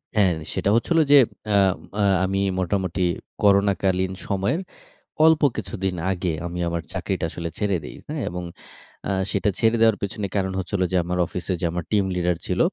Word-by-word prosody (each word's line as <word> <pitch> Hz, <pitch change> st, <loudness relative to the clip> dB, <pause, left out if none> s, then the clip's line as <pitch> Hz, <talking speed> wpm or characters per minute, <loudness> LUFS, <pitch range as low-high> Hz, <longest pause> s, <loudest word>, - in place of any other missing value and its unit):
হ্যাঁ, 100 Hz, -4 st, +4 dB, 0.2 s
সেটা -, -, 0 dB
হচ্ছিল 165 Hz, +8 st, +1 dB
যে, 145 Hz, -, +9 dB, 0.4 s
আ -, -, +6 dB, 0.4 s
আ -, -, +3 dB, 0.2 s
আমি 95 Hz, +1 st, -1 dB, 0.2 s
মোটামুটি 95 Hz, 0 st, 0 dB, 0.4 s
করোনাকালীন 100 Hz, -2 st, +3 dB, 0.2 s
সময়ের 100 Hz, -, 0 dB, 0.7 s
অল্প 160 Hz, -1 st, +5 dB, 0.2 s
কিছুদিন 95 Hz, -2 st, -3 dB, 0.2 s
আগে 90 Hz, -2 st, -1 dB
আমি 90 Hz, +1 st, -5 dB
আমার 85 Hz, 0 st, -2 dB
চাকরিটা -, -, -2 dB
আসলে 85 Hz, -1 st, -5 dB
ছেড়ে 100 Hz, -3 st, +1 dB
দেই, -, -, -8 dB
হ্যাঁ? 150 Hz, -1 st, -4 dB
এবং 90 Hz, 0 st, -5 dB, 0.7 s
আ -, -, +1 dB, 0.2 s
সেটা 100 Hz, +1 st, +1 dB
ছেড়ে 115 Hz, 0 st, +3 dB
দেওয়ার 110 Hz, -2 st, +5 dB
পেছনে 100 Hz, +1 st, -3 dB
কারণ 95 Hz, -1 st, 0 dB
হচ্ছে 95 Hz, -, -6 dB
হলো 90 Hz, -2 st, +1 dB
যে, -, -, +4 dB
আমার 90 Hz, +1 st, -2 dB
অফিসে 90 Hz, +1 st, -3 dB
যে, -, -, 0 dB
আমার 85 Hz, 0 st, -3 dB
টিম 105 Hz, -2 st, +3 dB
লিডার 90 Hz, -1 st, +1 dB
ছিল, -, -, -1 dB
95 Hz, 175 wpm, -23 LUFS, 90-105 Hz, 0.7 s, যে